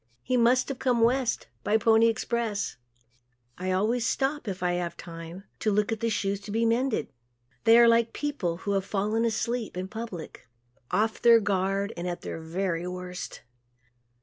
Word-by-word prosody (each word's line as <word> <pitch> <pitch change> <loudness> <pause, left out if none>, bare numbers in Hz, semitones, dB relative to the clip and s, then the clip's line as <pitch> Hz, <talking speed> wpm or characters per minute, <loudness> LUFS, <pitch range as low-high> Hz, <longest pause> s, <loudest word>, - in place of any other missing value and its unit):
He 255 - 0
must 245 +2 +4
have 275 - -4
come 250 -3 +2
West 245 +1 +2 0.2
by 215 - +3
the 220 - -8
"Pony 225 0 +6
Express." 225 -2 -1 0.8
I 185 +1 -1
always 220 +6 +1
stop, 270 +2 -1
if 185 -2 -4
I 180 - +2
have 175 -1 -3
time, 165 +2 -9 0.2
to 215 - +1
look 210 +2 +1
at 225 +1 -1
shoes 200 -2 -1
to 200 - -11
be 225 +3 +1
mended. 235 +1 0 0.5
They 225 +1 +8
are 235 0 +8
like 230 0 +4
people 240 -14 -2
who 200 - 0
have 195 -1 +1
fallen 210 +3 0
asleep 230 -2 -2
in 185 +1 -3
public, 215 - -7 0.4
off 215 +4 0
their 235 -1 +7
guard 195 0 0
and 175 +1 -4
at 175 -1 -4
their - - -5
very 170 +1 -2
worst. 180 0 -6
215 Hz, 175 wpm, -27 LUFS, 185-230 Hz, 0.8 s, They